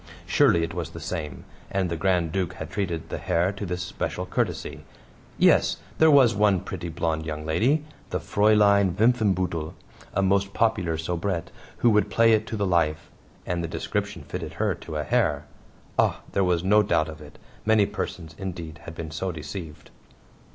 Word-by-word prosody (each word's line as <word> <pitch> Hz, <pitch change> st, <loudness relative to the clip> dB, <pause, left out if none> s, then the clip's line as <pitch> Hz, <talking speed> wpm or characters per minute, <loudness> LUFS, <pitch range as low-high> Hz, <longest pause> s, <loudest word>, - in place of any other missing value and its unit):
Surely 85 Hz, -, +4 dB
it 80 Hz, -, -3 dB
was -, -, -4 dB
the -, -, -9 dB
same, 75 Hz, -6 st, -5 dB, 0.2 s
and 95 Hz, -1 st, 0 dB
the 85 Hz, -, -2 dB
Grand 85 Hz, -1 st, +1 dB
Duke 90 Hz, -1 st, -1 dB
had -, -, -8 dB
treated 85 Hz, -5 st, -3 dB
the -, -, -4 dB
Herr 90 Hz, +1 st, +1 dB
to 100 Hz, 0 st, -6 dB
this 90 Hz, 0 st, -3 dB
special 90 Hz, -, -3 dB
courtesy. -, -, -2 dB, 0.5 s
Yes -, -, +4 dB, 0.2 s
there 160 Hz, -, +7 dB
was 135 Hz, -6 st, +6 dB
one 100 Hz, -3 st, +3 dB
pretty, 85 Hz, -4 st, -6 dB
blonde 80 Hz, -1 st, -1 dB
young 75 Hz, -1 st, -5 dB
lady 130 Hz, -, +2 dB, 0.2 s
the 90 Hz, -, -1 dB
Fraulein 100 Hz, +1 st, +4 dB
Wimpfenbuttel, 95 Hz, -8 st, +1 dB, 0.4 s
a 100 Hz, -, +2 dB
most 100 Hz, +1 st, +1 dB
popular 100 Hz, -8 st, +1 dB
soubrette, 85 Hz, +1 st, -2 dB, 0.3 s
who 120 Hz, -, +4 dB
would 105 Hz, 0 st, +3 dB
play 115 Hz, 0 st, +4 dB
it 110 Hz, 0 st, +1 dB
to 110 Hz, -, -4 dB
the 100 Hz, -, 0 dB
life! 85 Hz, -4 st, 0 dB, 0.3 s
And 85 Hz, -1 st, -2 dB
the -, -, -2 dB
description -, -, -3 dB
fitted -, -, -6 dB
her -, -, 0 dB
to 80 Hz, -, -8 dB
a 75 Hz, -, -1 dB
hair! -, -, +1 dB, 0.5 s
Ah, -, -, +2 dB
there 100 Hz, -, +2 dB
was 90 Hz, -2 st, +1 dB
no 105 Hz, +3 st, +5 dB
doubt 80 Hz, -6 st, +1 dB
of 80 Hz, -1 st, -9 dB
it; 75 Hz, -1 st, -13 dB, 0.3 s
many 110 Hz, -2 st, +4 dB
persons, 80 Hz, -4 st, -5 dB
indeed, 85 Hz, -4 st, -6 dB
had 85 Hz, -, -8 dB
been 80 Hz, -2 st, -6 dB
so 90 Hz, +4 st, -2 dB
deceived. 80 Hz, 0 st, -8 dB
90 Hz, 180 wpm, -25 LUFS, 80-100 Hz, 0.5 s, there